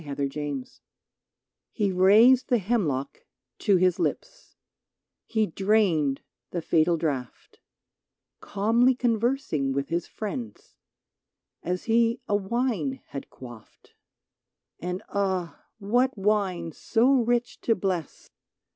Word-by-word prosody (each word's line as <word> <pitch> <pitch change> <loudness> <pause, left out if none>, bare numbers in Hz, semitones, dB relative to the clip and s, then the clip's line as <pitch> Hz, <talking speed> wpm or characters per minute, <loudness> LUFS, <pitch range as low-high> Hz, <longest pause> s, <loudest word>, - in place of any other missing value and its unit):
94 140 -1 -3 0.3
SOCRATES 130 -2 -10 0.9
T 210 - 0
Te 195 - +1
raised 215 +8 +5
the 245 - +4
hemlock 175 - -1 0.4
to 200 - +3
his 180 -1 +2
lips, - - -4 0.7
He 220 -2 +1
drained 180 -8 +1 0.3
the 170 -2 -4
fatal 165 +1 +2
draught, 140 -6 -4 0.8
Calmly 230 +5 +2
conversing 230 - 0
with 140 0 -2
his 170 +1 -2
friends. 125 - -7 0.9
As 180 +1 -3
he 230 +1 +2
a 205 - +1
wine 205 - -1
had 140 - -7
quaffed; 120 -4 -14 0.9
And, 180 +1 -4
ah! 190 -4 -2
what 245 +5 +1
wine 190 -4 0
so 245 - +2
rich 240 +1 -1
to 225 - +2
bless 185 -5 -4
195 Hz, 110 wpm, -26 LUFS, 160-230 Hz, 0.9 s, raised